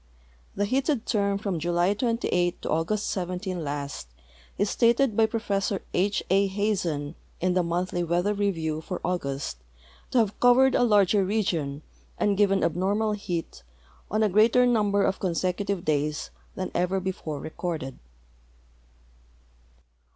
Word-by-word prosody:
The 205 Hz, -, +1 dB
heated 265 Hz, +2 st, 0 dB
term 200 Hz, -3 st, +1 dB
from 200 Hz, -4 st, -2 dB
July 175 Hz, +3 st, +1 dB
28 205 Hz, -6 st, 0 dB
to -, -, -3 dB
August 180 Hz, +7 st, 0 dB
17 180 Hz, -1 st, -3 dB
last 140 Hz, -, -4 dB, 0.5 s
is 205 Hz, -, +1 dB
stated 235 Hz, +1 st, +3 dB
by 220 Hz, 0 st, +4 dB
Prof. 210 Hz, -4 st, -1 dB, 0.2 s
H. 200 Hz, +3 st, +1 dB
A. 195 Hz, +1 st, +4 dB
Hazen 190 Hz, -7 st, -1 dB, 0.3 s
in 180 Hz, +1 st, +1 dB
the 180 Hz, -, +3 dB
Moufhlg 175 Hz, 0 st, -1 dB
Weathei 175 Hz, +5 st, +1 dB
Beriew 165 Hz, -6 st, -1 dB
for 180 Hz, +1 st, -4 dB
August 140 Hz, -, -2 dB, 0.5 s
to -, -, 0 dB
have 215 Hz, -4 st, +1 dB
covered 255 Hz, +2 st, +5 dB
a -, -, +3 dB
larger 205 Hz, -4 st, +4 dB
region 170 Hz, -8 st, -1 dB, 0.3 s
and 205 Hz, -1 st, +2 dB
given 195 Hz, -1 st, +3 dB
abnormal 200 Hz, +6 st, +1 dB
heat 175 Hz, -, -4 dB, 0.5 s
on 215 Hz, +2 st, +1 dB
a 215 Hz, -, +3 dB
greater 225 Hz, +5 st, +5 dB
number 205 Hz, -4 st, +2 dB
of 190 Hz, -, 0 dB
consecutive 185 Hz, +1 st, -1 dB
days 150 Hz, -, -1 dB, 0.2 s
than -, -, -4 dB
ever 180 Hz, +2 st, +1 dB
before 180 Hz, -5 st, -4 dB
recorded. 155 Hz, -5 st, -5 dB
190 Hz, 135 wpm, -26 LUFS, 170-210 Hz, 0.5 s, covered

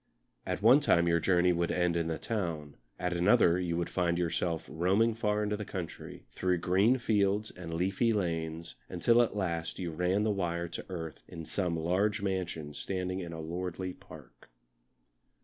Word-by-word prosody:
At -, -, -3 dB
one 125 Hz, +6 st, +8 dB
time 85 Hz, -, +3 dB
your 85 Hz, 0 st, +3 dB
journey 90 Hz, +1 st, +3 dB
would 85 Hz, 0 st, 0 dB
end 90 Hz, -1 st, +1 dB
in 85 Hz, -1 st, 0 dB
the 80 Hz, -1 st, -2 dB
town, 80 Hz, -8 st, -3 dB, 0.2 s
at 90 Hz, 0 st, -1 dB
another 90 Hz, 0 st, +4 dB
you 85 Hz, -2 st, -1 dB
would 85 Hz, -, -2 dB
find 85 Hz, -2 st, +1 dB
yourself 85 Hz, -1 st, -1 dB
roaming 95 Hz, +8 st, +2 dB
far 105 Hz, -2 st, 0 dB
into 105 Hz, 0 st, -1 dB
the 105 Hz, -, -4 dB
country, 90 Hz, -4 st, -7 dB
through 90 Hz, -1 st, 0 dB
green 95 Hz, +9 st, +3 dB
fields 105 Hz, -2 st, +1 dB
and 85 Hz, -2 st, -7 dB
leafy 95 Hz, +7 st, +1 dB
lanes 85 Hz, -4 st, -2 dB
until 115 Hz, +7 st, +4 dB
at 115 Hz, -, 0 dB
last 85 Hz, -4 st, -2 dB
you 90 Hz, -2 st, -3 dB
ran 90 Hz, +5 st, +1 dB
the 110 Hz, -, +2 dB
wire 85 Hz, -3 st, -1 dB
to -, -, -7 dB
earth 80 Hz, -4 st, -6 dB
in 80 Hz, -1 st, -8 dB
some 85 Hz, +1 st, -1 dB
large 95 Hz, +6 st, +1 dB
mansion 90 Hz, -6 st, -3 dB
standing 90 Hz, +3 st, -3 dB
in 85 Hz, -3 st, -6 dB
a 80 Hz, -, -6 dB
lordly 90 Hz, +3 st, -4 dB
park. -, -, -15 dB
90 Hz, 175 wpm, -31 LUFS, 85-100 Hz, 0.2 s, one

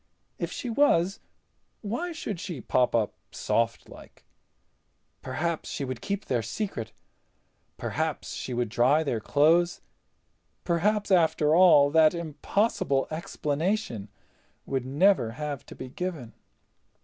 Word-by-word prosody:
If -, -, -3 dB
she -, -, -5 dB
was, 195 Hz, -8 st, +2 dB, 0.6 s
why 240 Hz, -, -3 dB
should 215 Hz, -, -5 dB
she 180 Hz, -7 st, -5 dB
pop 125 Hz, +1 st, +1 dB
up 110 Hz, -3 st, +1 dB, 0.2 s
softlike? 115 Hz, -1 st, -3 dB, 1.0 s
Perhaps 170 Hz, 0 st, -3 dB
she 140 Hz, -, -3 dB
would 130 Hz, -3 st, -5 dB
keep 200 Hz, +1 st, -3 dB
their 125 Hz, -3 st, 0 dB
secret. 115 Hz, -, -4 dB, 0.9 s
Perhaps -, -, -3 dB
she -, -, -5 dB
would 120 Hz, -2 st, -1 dB
dry 130 Hz, +8 st, +3 dB
their 125 Hz, -7 st, -1 dB
clothes. 165 Hz, +9 st, +3 dB, 0.8 s
Perhaps, 205 Hz, +5 st, +1 dB
after 160 Hz, -4 st, +3 dB
all, 165 Hz, -6 st, +6 dB
that 160 Hz, +1 st, +5 dB
impossible 160 Hz, -2 st, 0 dB
explanation 155 Hz, -, -2 dB, 0.6 s
would 130 Hz, -2 st, -2 dB
never 145 Hz, -, +3 dB
have 145 Hz, 0 st, -5 dB
to -, -, -10 dB
be 130 Hz, -, -8 dB
given. 160 Hz, -6 st, -5 dB
155 Hz, 115 wpm, -27 LUFS, 130-185 Hz, 1.0 s, all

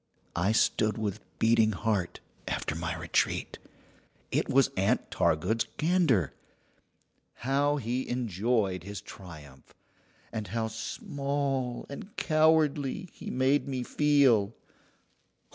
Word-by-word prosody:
I 90 Hz, +5 st, +2 dB
stood 110 Hz, -1 st, +2 dB
with 105 Hz, -3 st, -2 dB, 0.2 s
beating 110 Hz, -1 st, +4 dB
heart, 100 Hz, -3 st, -1 dB, 0.3 s
after -, -, -2 dB
my 80 Hz, 0 st, -3 dB
retreat. -, -, -1 dB, 0.7 s
It -, -, 0 dB
was 135 Hz, 0 st, +4 dB
Aunt 95 Hz, +1 st, +1 dB
Targood's 105 Hz, +9 st, +1 dB
gander. 155 Hz, -, +2 dB, 1.0 s
How 140 Hz, +3 st, +1 dB
he 125 Hz, -1 st, -2 dB
enjoyed 110 Hz, -4 st, 0 dB
his 100 Hz, +2 st, -6 dB
triumph, 75 Hz, -9 st, -12 dB, 0.6 s
and 110 Hz, -2 st, -3 dB
how 110 Hz, +3 st, -2 dB
small 135 Hz, +3 st, -2 dB
and 190 Hz, +9 st, -9 dB
cowardly 155 Hz, -1 st, +2 dB
he -, -, -8 dB
made 130 Hz, +3 st, +2 dB
me 130 Hz, -2 st, -2 dB
feel! 130 Hz, -8 st, +3 dB
115 Hz, 105 wpm, -29 LUFS, 100-140 Hz, 1.0 s, beating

